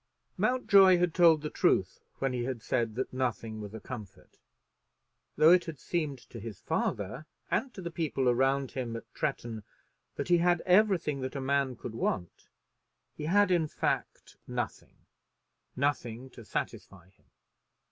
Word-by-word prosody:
Mountjoy 200 -7 +5
had 175 -2 +1
told 165 -4 +5
the 150 - -3
truth - - +1 0.2
when 135 -1 -1
he 125 -1 -1
had 125 -4 -4
said 115 -3 -1
that 130 +1 -3
nothing 115 -4 -2
was 105 +1 -8
a - - -6
comfort. 110 -5 -10 1.0
Though 155 +2 +6
it 170 -5 +2
seemed 155 -6 -2
to 115 - -7
his 110 -2 -8
father 110 +9 -2 0.2
and 260 - 0
to 190 - -7
the 170 - -4
people 155 -6 -1
around 135 +2 +2
him 120 -3 -4
at 115 - -6
Tretton 120 -7 -3 0.5
that - - -4
he 175 -1 +5
had 175 0 +3
everything 180 -7 +3
that 130 +2 -4
a - - -2
man 135 -1 0
could 115 - -7
want, 90 -5 -3 0.7
he 150 - -6
had, 200 +3 +4
in 170 -3 +3
fact, - - -3
nothing, - - -5 0.7
nothing 130 -2 -2
to 120 - -12
satisfy 95 -3 -5
him. - - -34
135 Hz, 155 wpm, -30 LUFS, 120-170 Hz, 1.0 s, Though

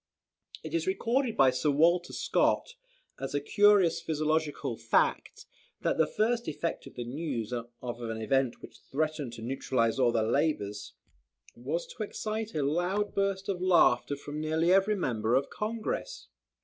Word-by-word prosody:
It - - -7
is 335 +2 0
recorded 255 - 0
by 130 -1 +6
Sir 130 +4 0
Walter 170 +5 +3
Scott, 485 - +1 0.5
as 135 +1 -4
a - - +2
curious 205 +2 +4
physiological 155 -4 -1
fact, 115 0 0 0.4
that - - 0
the - - +4
first 235 +2 0
effect 165 +2 -3
of - - -13
the 120 - -4
news 125 -3 -4
of 120 -1 -4 0.3
an 115 -1 -4
event 130 +2 0
which - - -12
threatened 150 -3 -3
to 115 - -8
neutralise 120 -1 0
all 125 -2 +4
their 115 -1 +1
labours, 115 -7 -1 0.6
was 145 +8 -3
to - - -10
excite 215 +1 -4
a 150 - 0
loud 180 +8 0
burst 195 -1 -1
of 185 -3 -2
laughter 165 -7 +4
from 145 +2 -6
nearly 160 +3 +2
every 195 +2 +3
member 115 - 0
of 135 - +3
the - - -18
Congress. 230 - -4
155 Hz, 160 wpm, -29 LUFS, 125-195 Hz, 0.6 s, by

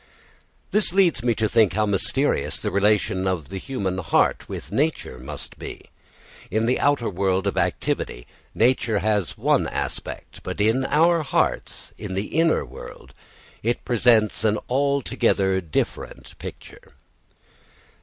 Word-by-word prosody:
This 210 -4 +2
leads 185 -9 +3
me 120 -1 +1
to 110 0 +1
think 110 -4 +3
how 105 +2 +2
mysterious 100 -2 +1
the - - -2
relation 100 -1 +2
of 85 -7 -2
the 95 - -5
human 95 -7 -3
heart 85 - +1
with - - -7
nature 145 - -1
must 70 +3 -8
be. - - -9 0.6
In 110 +4 +1
the 125 +2 +1
outer 140 -5 +2
world 95 0 0
of 100 - 0
activity 90 -8 -1 0.3
nature 115 -2 +2
has 105 -3 0
one - - +2
aspect, - - -5
but - - -6
in 115 +6 +2
our 165 +3 +3
hearts, 140 - -1
in 100 -3 -5
the 100 +8 -3
inner 165 -1 +3
world, - - -11 0.5
it 120 +2 -1
presents 115 -3 +3
an 110 -1 +2
altogether 130 -8 +1
different 80 -4 -4
picture. - - -10
110 Hz, 135 wpm, -23 LUFS, 95-130 Hz, 0.6 s, leads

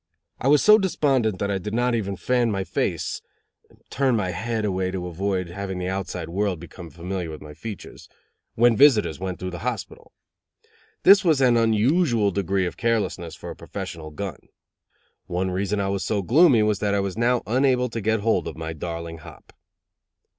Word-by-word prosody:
I - - -1
was 145 +1 +5
so 215 0 +7
despondent 135 - +1
that 100 +2 -2
I 100 - -1
did 105 +4 -5
not 120 +1 +1
even 100 -4 -1
"fan 120 +6 +1
my 100 -3 -1
face" 90 - -2 0.7
(turn 135 -3 +2
my 95 -4 -1
head 110 +3 -2
away 95 -2 -1
to 95 -1 -4
avoid 90 +1 -2
having 95 +1 -5
the 90 0 -3
outside 95 -3 -4
world 95 0 -1
become 85 0 -10
familiar 90 +1 -5
with 75 -1 -8
my 75 0 -10
features) 105 +6 -9 0.5
when 120 0 +4
visitors 110 - +4
went 95 -1 -4
through 90 0 -5
the 85 - -6
hospital. 120 -4 -5 0.9
This 200 -1 +7
was 160 -6 +3
an 125 -3 +4
unusual 115 - +2
degree 95 0 0
of 90 - -5
carelessness 105 -7 -1
for - - -8
a - - -8
professional 80 -2 -7
gun. 90 +1 -6 0.9
One 90 +1 -1
reason 100 +2 -1
I 100 -1 -1
was 100 -1 -2
so 105 -3 -1
gloomy 130 - +5
was 105 -2 +1
that 100 -1 0
I - - +2
was 100 -1 -2
now 120 +2 +1
unable 125 +1 +2
to 115 0 -4
get 110 +1 +1
hold 115 +2 +1
of - - -7
my 80 0 -5
darling 85 +1 -6
hop. 80 - -14
100 Hz, 185 wpm, -24 LUFS, 90-120 Hz, 0.9 s, so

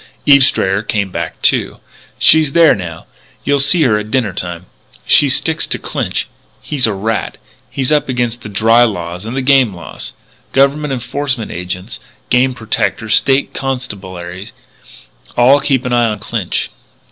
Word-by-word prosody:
"Eve 140 -1 +6
Strayer 95 -6 +1
came 100 -3 -2
back 85 -2 -5
too. - - +1 0.4
She's 155 -3 +4
there 165 -2 +6
now. 85 -6 -7 0.4
You'll 140 +1 +1
see 140 +4 +4
her 110 -6 +2
at 105 0 -7
dinner 115 -6 0
time. 90 -1 -4 0.4
She - - +5
sticks - - +2
to - - 0
Clinch. - - -3 0.3
He's 140 -5 0
a 110 - -1
rat. 110 +3 -3 0.3
He's 135 +1 -1
up 150 -2 +1
against 120 -2 -2
the 105 - -8
dry 115 +4 +4
laws 90 -4 -3
and 115 +3 -5
the 135 - -1
game 130 -6 +3
laws. 85 - -9 0.4
Government 140 +2 +2
enforcement 130 -1 -3
agents, 90 +1 -6 0.3
game 125 +1 +2
protectors, 110 -1 -2
State 135 0 +2
Constabulary, 95 -8 -5 0.9
all 130 +4 +5
keep 135 -2 0
an 125 - -1
eye 120 -1 +3
on 105 -1 -2
Clinch. - - -3
120 Hz, 155 wpm, -15 LUFS, 100-135 Hz, 0.9 s, Eve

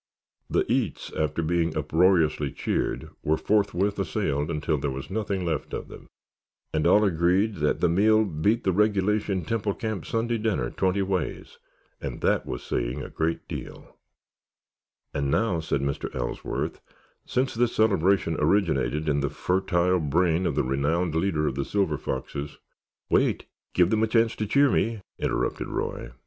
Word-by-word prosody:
"The - - +2
eats" - - -1
after 75 +1 -1
being 85 -1 0
uproariously 80 -2 +2
cheered, - - -2
were 80 +1 +1
forthwith 100 0 +1
assailed 75 -5 -1
until 75 -1 -1
there 70 - -1
was 65 +6 -6
nothing 100 -3 -2
left 80 -5 -2
of - - -6
them, - - -12 0.7
and 80 +1 +2
all 105 +4 +5
agreed 95 +3 +2
that 75 -1 0
the 90 - +4
meal 110 +5 +4
beat 100 +7 0
the 95 - +2
regulation 105 -1 +1
Temple 105 0 -1
Camp 110 -7 -4
Sunday 115 0 0
dinner 110 -2 -1
twenty 95 +1 +1
ways. 95 -6 -3 0.4
And - - -5
that - - +1
was - - -5
saying - - -2
a - - -8
good 80 +1 -2
deal. - - -8 1.2
"And 70 -1 -1
now," 95 +2 +1
said 80 -3 -1
Mr. 70 0 -2
Ellsworth, 60 -2 -3 0.4
"since 130 +1 0
this 120 +1 +1
celebration 100 -5 +3
originated 80 -3 +1
in 70 -1 +2
the 70 0 0
fertile 90 +3 +1
brain 85 +3 +1
of 75 - -1
the - - +2
renowned 75 +6 0
leader 80 -2 +1
of 70 - 0
the 70 +1 -2
Silver 90 -4 0
Foxes——" 70 +3 -4 0.5
"Wait, - - +2 0.3
give 90 - +4
them 110 -1 +2
a 110 - +3
chance 115 0 +2
to 110 - -2
cheer 140 +4 +4
me," 115 -2 0 0.2
interrupted - - -1
Roy. - - -3
90 Hz, 160 wpm, -26 LUFS, 75-105 Hz, 1.2 s, all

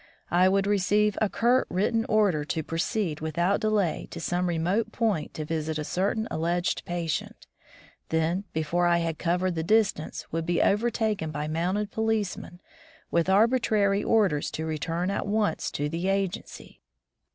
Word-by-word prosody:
I 180 +2 +5
would 195 0 +2
receive 205 +1 +2
a 215 - +3
curt 245 +5 +2
written 225 +5 +1
order 200 -8 +3
to 160 +1 -3
proceed 165 +1 -2
without 170 +5 +1
delay 210 -7 0
to - - -7
some 175 +2 -1
remote 185 +7 0
point 215 -10 -1
to 155 - -4
visit 160 0 -2
a 155 - -2
certain 200 +7 -1
alleged 175 +2 -1
patient; 170 -3 -3 0.6
then, 165 +4 0
before 170 +2 0
I 170 0 +4
had 165 -2 -2
covered 180 +1 0
the 160 - -2
distance, 200 -3 +1
would 165 0 -2
be 175 - +1
overtaken 215 -4 +1
by 150 -1 -4
a - - -4
mounted 185 +6 -1
policeman 215 -5 -2 0.5
with 170 +2 +2
arbitrary 210 -1 +3
orders 195 -10 +2
to 160 - -3
return 165 +4 -2
at 200 - -2
once 210 0 0
to 145 - -1
the 165 +5 -3
agency. 195 -1 -3
180 Hz, 155 wpm, -27 LUFS, 165-210 Hz, 0.6 s, I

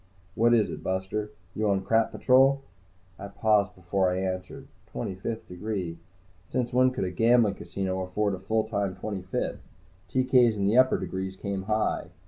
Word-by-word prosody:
"What 120 +3 +4
is 110 -3 +2
it, - - -7
buster? 95 +3 -2 0.2
You 110 +1 0
on 95 -1 +1
Crap 115 +2 +2
Patrol?" 135 +1 +4 0.6
I 100 - -6
paused 105 -2 +1
before 95 +1 0
I 90 - -1
answered. 95 -1 -4 0.2
Twenty - - -4
fifth 110 +5 -5
degree? 90 -3 -4 0.5
Since 125 -1 -2
when 130 +1 +5
could 130 - -3
a 90 - -2
gambling 115 +2 +4
casino 95 +1 -4
afford 100 +2 -1
a 95 - -4
full 110 +4 0
time 100 -3 -2
Twenty 95 0 -5
fifth? 90 - -3 0.5
TK's 125 -3 +4
in 100 - 0
the 105 +3 +2
upper 130 +1 +5
degrees 95 +1 -4
come 100 -1 -3
high. 110 +1 0
100 Hz, 170 wpm, -27 LUFS, 95-115 Hz, 0.6 s, when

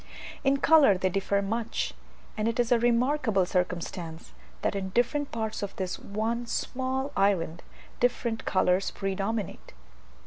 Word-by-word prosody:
In 275 0 +3
colour 280 -9 +6
they 185 0 +1
differ 200 +2 0
much; 225 +3 -2 0.4
and 215 -2 0
it 230 +1 -1
is 240 0 +2
a 240 - +5
remarkable 240 -4 +2
circumstance, 175 - -3 0.3
that - - +1
in 190 -1 -2
different 265 +7 0
parts 220 -1 -3
of 200 -1 -4
this 185 -2 -3
one 225 +4 -2
small 265 +3 -2
island, 175 -4 +1 0.4
different 240 -2 0
colours 185 0 +2
predominate. 195 +1 -3
215 Hz, 135 wpm, -28 LUFS, 190-240 Hz, 0.4 s, colour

